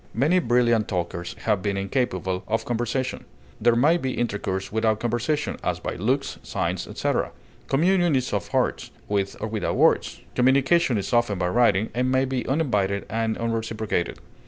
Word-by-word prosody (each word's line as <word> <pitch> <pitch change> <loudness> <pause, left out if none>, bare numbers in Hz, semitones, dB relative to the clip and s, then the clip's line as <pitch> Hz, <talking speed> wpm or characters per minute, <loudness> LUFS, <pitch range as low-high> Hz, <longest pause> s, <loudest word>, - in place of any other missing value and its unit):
Many 150 +10 +3
brilliant 120 - +2
talkers 85 -1 -3
have 105 -4 +1
been 100 0 -1
incapable 95 -4 -1
of 110 +1 -1
conversation. 120 +2 -2 0.4
There 120 +1 +4
may 150 +8 +4
be 130 -6 -2
intercourse 100 -4 -2
without 110 0 +1
conversation, 120 +6 -1
as - - -1
by - - -4
looks, 130 +9 -1
signs, - - -2
etc.; - - -1 0.4
communion 175 +2 +3
is 130 -3 -1
of 100 -3 -1
hearts, - - 0 0.2
with 100 -1 -1
or - - -3
without 110 -3 -2
words; - - +2
communication 135 +1 +3
is 100 - -3
often 120 -4 +2
by 90 -1 0
writing, 110 -1 +3
and 125 +2 0
may 130 +1 +3
be 130 -1 -2
uninvited 105 -9 0
and 110 0 -1
unreciprocated. 110 -5 -2
115 Hz, 160 wpm, -24 LUFS, 100-130 Hz, 0.4 s, There